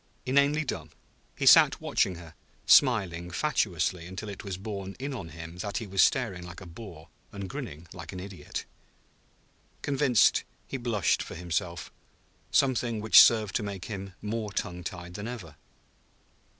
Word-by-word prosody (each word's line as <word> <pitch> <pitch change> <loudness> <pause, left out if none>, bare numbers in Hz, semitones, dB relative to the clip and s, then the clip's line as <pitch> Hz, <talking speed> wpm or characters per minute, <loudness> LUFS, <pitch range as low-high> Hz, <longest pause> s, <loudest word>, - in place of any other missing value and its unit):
Inanely 140 +3 +3
dumb, 80 - -4 0.5
he - - -2
sat - - +7
watching 95 - +1
her, 85 -2 -11 0.3
smiling 95 -10 +4
fatuously 90 - 0
until 95 +4 -6
it 100 - -8
was 95 -3 -5
borne 100 -1 -6
in 140 +2 -4
on 95 -10 -6
him 85 +1 -9
that 100 +2 -3
he 115 - -3
was 95 -1 +2
staring 115 -9 +2
like 85 0 -9
a 95 - -10
boor 85 -2 -11 0.2
and 100 -1 -6
grinning 80 -2 -7
like 85 -2 -8
an 95 - -7
idiot. 95 0 -7 1.2
Convinced, 140 -4 +3 0.2
he 135 - -4
blushed 120 -5 +1
for - - -7
himself; 85 0 -3 0.6
something 125 -5 +2
which 105 -3 +9
served 110 -4 +4
to - - -4
make 100 -4 -5
him 100 -3 -6
more 105 0 -3
tongue 90 -2 -4
tied 90 +1 -7
than 105 +3 -6
ever. 100 -12 -7
100 Hz, 155 wpm, -28 LUFS, 90-115 Hz, 1.2 s, which